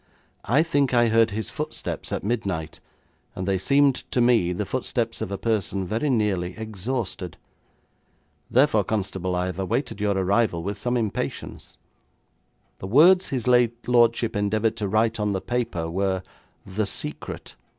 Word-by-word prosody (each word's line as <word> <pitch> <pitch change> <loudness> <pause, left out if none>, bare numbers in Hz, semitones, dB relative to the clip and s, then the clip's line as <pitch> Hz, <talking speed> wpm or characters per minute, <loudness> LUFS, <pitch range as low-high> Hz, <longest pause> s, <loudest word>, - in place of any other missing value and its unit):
I 140 +7 +4
think 145 -6 +1
I 120 -1 +4
heard 115 0 +4
his 110 0 -4
footsteps - - -5
at - - -2
midnight, 95 -8 -2 0.6
and 95 +1 -4
they 95 -1 +1
seemed 140 +6 +4 0.2
to - - 0
me 120 -7 +4
the 90 - -2
footsteps - - -2
of - - -3
a 100 - -2
person 100 -4 -1
very 115 +11 -1
nearly 100 -7 0
exhausted. 110 -4 -4 1.1
Therefore, 125 -5 +4
constable, 95 -3 -2
I 90 0 0
have 90 0 -4
awaited 100 +3 -2
your 100 -1 +1
arrival 95 -2 +1
with 100 +2 -4
some 120 +4 0
impatience. 110 -4 -4 1.0
The 95 - -6
words 175 - +6
his 130 -4 -2
late 120 -1 +2
lordship 120 -1 +3
endeavoured 105 +2 +1
to 105 - -2
write 110 +3 +1
on 105 -1 0
the 95 - -1 0.2
paper 85 -9 -3
were 95 +2 -1 0.4
"The 100 +2 -2
Secret". - - -5
110 Hz, 150 wpm, -24 LUFS, 95-120 Hz, 1.1 s, words